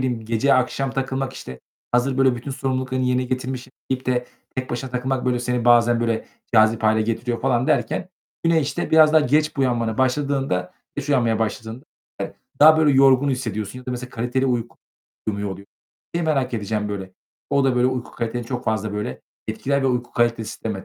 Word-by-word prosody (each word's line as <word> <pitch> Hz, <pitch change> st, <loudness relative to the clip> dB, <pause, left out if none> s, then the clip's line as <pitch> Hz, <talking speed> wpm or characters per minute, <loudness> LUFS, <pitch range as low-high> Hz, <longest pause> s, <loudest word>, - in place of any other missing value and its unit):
bileyim 125 Hz, -4 st, -2 dB
gece 115 Hz, +5 st, +2 dB
akşam 130 Hz, +1 st, 0 dB
takılmak, 135 Hz, 0 st, -2 dB
işte, 65 Hz, 0 st, -9 dB, 0.3 s
hazır 130 Hz, +2 st, +2 dB
böyle 130 Hz, -2 st, +4 dB
bütün 120 Hz, +4 st, -6 dB
sorumluluklarını 130 Hz, -1 st, -1 dB
yerine 125 Hz, 0 st, +2 dB
getirmişim, 130 Hz, 0 st, -4 dB, 0.2 s
deyip 130 Hz, -1 st, -2 dB
de 125 Hz, -1 st, 0 dB, 0.3 s
tek 130 Hz, 0 st, -3 dB
başına 125 Hz, +2 st, -4 dB
takılmak. 125 Hz, +1 st, -1 dB
Böyle, 125 Hz, -1 st, +1 dB
seni 125 Hz, -1 st, -1 dB
bazen, 120 Hz, -1 st, +5 dB
böyle, 115 Hz, -1 st, -1 dB, 0.3 s
cazip 110 Hz, 0 st, +5 dB
hâle 110 Hz, 0 st, +3 dB
getiriyor 115 Hz, +2 st, -2 dB
falan 130 Hz, -1 st, +1 dB
derken 185 Hz, -, 0 dB, 0.4 s
yine, 165 Hz, -1 st, +4 dB
işte, 150 Hz, +4 st, -2 dB
biraz 155 Hz, -1 st, +6 dB
daha 160 Hz, -, +6 dB
geç 150 Hz, +2 st, +1 dB
buyanmaya 120 Hz, -5 st, 0 dB
başladığında 135 Hz, -6 st, 0 dB, 0.2 s
geç 145 Hz, -, -4 dB
uyanmaya 120 Hz, -5 st, +2 dB
başladığında 110 Hz, +3 st, -3 dB, 0.8 s
daha 155 Hz, +1 st, +8 dB
böyle 155 Hz, -2 st, +5 dB
yorgun 135 Hz, +1 st, +5 dB
hissediyorsun 110 Hz, -3 st, -3 dB
ya 125 Hz, -, -13 dB
da -, -, -2 dB
mesela 125 Hz, 0 st, -5 dB
kaliteli 125 Hz, +3 st, -1 dB
uyku 120 Hz, -2 st, -2 dB, 0.5 s
uyumuyor, 100 Hz, -1 st, -2 dB
oluyor. 100 Hz, +1 st, -8 dB, 0.5 s
Seni 170 Hz, -, 0 dB
merak 135 Hz, -5 st, 0 dB
edeceğim 105 Hz, -1 st, -2 dB
böyle. 95 Hz, -2 st, -5 dB, 0.4 s
O 140 Hz, -1 st, +3 dB
da 130 Hz, -2 st, +2 dB
böyle 125 Hz, +1 st, +4 dB
uyku 130 Hz, -2 st, -2 dB
kaliteni 115 Hz, +1 st, -3 dB
çok 125 Hz, 0 st, -4 dB
fazla, 110 Hz, -1 st, -1 dB
böyle, 65 Hz, -11 st, -4 dB, 0.3 s
etkiler 140 Hz, 0 st, 0 dB
ve 135 Hz, -, +2 dB
uyku 125 Hz, -1 st, -1 dB
kalitesi 115 Hz, -2 st, +1 dB
sistemi. 105 Hz, -4 st, -5 dB
125 Hz, 180 wpm, -22 LUFS, 115-135 Hz, 0.8 s, daha